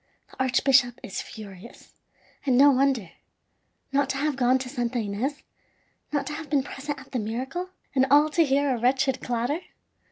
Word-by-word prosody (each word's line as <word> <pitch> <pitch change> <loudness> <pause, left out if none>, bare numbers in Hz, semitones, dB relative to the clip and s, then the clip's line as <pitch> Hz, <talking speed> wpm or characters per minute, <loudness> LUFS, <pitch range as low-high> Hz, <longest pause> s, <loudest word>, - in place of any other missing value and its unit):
The - - -2
archbishop 260 -1 +3
is 195 - -4
furious, 205 0 -12 0.5
and 260 -3 +2
no 285 +2 +8
wonder. 260 -9 +1 0.8
Not 275 0 +1
to 270 - -1
have 295 0 0
gone 255 0 +3
to 260 0 -5
Santa 245 -2 -2
Ines, 230 +7 -3 0.7
not 290 -2 0
to 300 - -5
have 310 -1 -7
been 280 -2 +2
present 285 +1 -6
at 265 - -15
the 255 - -1
miracle 260 +12 -4 0.2
and 265 -1 +3
all 295 +3 +6
to 330 +2 +4
hear 280 -1 +2
a - - -5
wretched 265 +2 +1
clatter! 245 +6 -1
265 Hz, 170 wpm, -26 LUFS, 245-285 Hz, 0.8 s, no